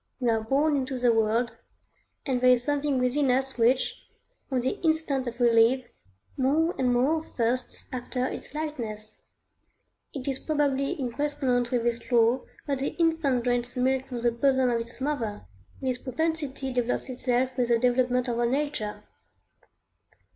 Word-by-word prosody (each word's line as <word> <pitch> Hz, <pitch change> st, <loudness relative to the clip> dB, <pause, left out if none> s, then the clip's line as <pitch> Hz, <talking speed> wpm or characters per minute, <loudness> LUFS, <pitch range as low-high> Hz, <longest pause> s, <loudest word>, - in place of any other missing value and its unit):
We 245 Hz, -3 st, +2 dB
are 225 Hz, -1 st, 0 dB
born 285 Hz, +6 st, +2 dB
into 265 Hz, -1 st, -2 dB
the 245 Hz, -1 st, +3 dB
world, 225 Hz, +2 st, +1 dB, 0.7 s
and 260 Hz, -4 st, 0 dB
there 255 Hz, -, +5 dB
is 250 Hz, -1 st, +4 dB
something 290 Hz, 0 st, 0 dB
within 255 Hz, +2 st, +1 dB
us 265 Hz, 0 st, 0 dB
which, 245 Hz, +3 st, +2 dB, 0.5 s
from 260 Hz, -3 st, 0 dB
the 260 Hz, -, -2 dB
instant 315 Hz, -5 st, 0 dB
that 240 Hz, 0 st, -6 dB
we 240 Hz, -1 st, +4 dB
live, 230 Hz, +3 st, +4 dB, 0.5 s
more 305 Hz, +6 st, +2 dB
and 250 Hz, -2 st, +2 dB
more 270 Hz, +6 st, +2 dB
thirsts 245 Hz, -2 st, -2 dB
after 255 Hz, 0 st, -2 dB
its 265 Hz, -, -5 dB
likeness. 230 Hz, -9 st, -4 dB, 0.9 s
It 270 Hz, -2 st, -7 dB
is 270 Hz, -1 st, 0 dB
probably 285 Hz, -2 st, 0 dB
in 250 Hz, -3 st, -2 dB
correspondence 255 Hz, -3 st, 0 dB
with 245 Hz, -2 st, 0 dB
this 235 Hz, +1 st, -2 dB
law 235 Hz, +1 st, +4 dB, 0.2 s
that 280 Hz, -2 st, -1 dB
the 275 Hz, -, -2 dB
infant 320 Hz, -7 st, +1 dB
drains 245 Hz, 0 st, +1 dB
milk 260 Hz, +1 st, +1 dB
from 245 Hz, -3 st, -5 dB
the 240 Hz, 0 st, +2 dB
bosom 260 Hz, +1 st, +2 dB
of 230 Hz, -1 st, 0 dB
its 235 Hz, +2 st, -6 dB
mother; 240 Hz, -, -2 dB, 0.3 s
this 255 Hz, -2 st, 0 dB
propensity 275 Hz, -1 st, -1 dB
develops 245 Hz, +1 st, 0 dB
itself 255 Hz, 0 st, 0 dB
with 250 Hz, -2 st, +1 dB
the 235 Hz, -1 st, +3 dB
development 250 Hz, +1 st, +2 dB
of 235 Hz, -1 st, -1 dB
our 240 Hz, -, +2 dB
nature. 265 Hz, -5 st, -2 dB
255 Hz, 160 wpm, -27 LUFS, 240-275 Hz, 0.9 s, there